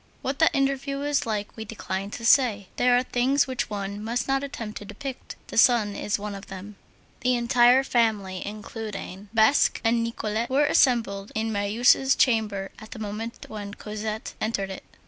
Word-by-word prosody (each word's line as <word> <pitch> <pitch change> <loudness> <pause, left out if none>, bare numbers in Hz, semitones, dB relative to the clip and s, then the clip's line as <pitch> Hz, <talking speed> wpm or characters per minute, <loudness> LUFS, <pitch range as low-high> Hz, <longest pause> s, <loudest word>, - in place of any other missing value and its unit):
What 265 +1 -2
that 320 - +4
interview 275 0 0
was 285 -2 0
like 210 -2 -3
we 220 - -6
decline 200 -2 -5
to 230 +2 -7
say. 225 -6 +4
There 245 0 +4
are 250 - +2
things 260 +3 +2
which 260 -2 -3
one 200 0 -4
must 235 +2 -2
not 270 0 +1
attempt 230 -6 -6
to 205 - -10
depict; 270 +4 -7
the - - +1
sun 225 -6 +4
is 210 - -1
one 205 0 -5
of 195 0 -9
them. 195 +2 -9 0.4
The 250 0 +2
entire 245 +2 +5
family, 215 -7 0
including 210 -2 -7
Basque 225 +5 +4
and 230 0 +2
Nicolette, 230 0 -2
were 280 +3 +3
assembled 225 -9 +2
in 220 +1 -1
Marius' 225 +6 +3
chamber 210 -6 +1
at 215 - -11
the - - -9
moment 220 +2 -6
when 205 -1 -7
Cosette 215 +1 -5
entered 200 -3 -1
it. 190 - -8
225 Hz, 175 wpm, -25 LUFS, 205-250 Hz, 0.4 s, entire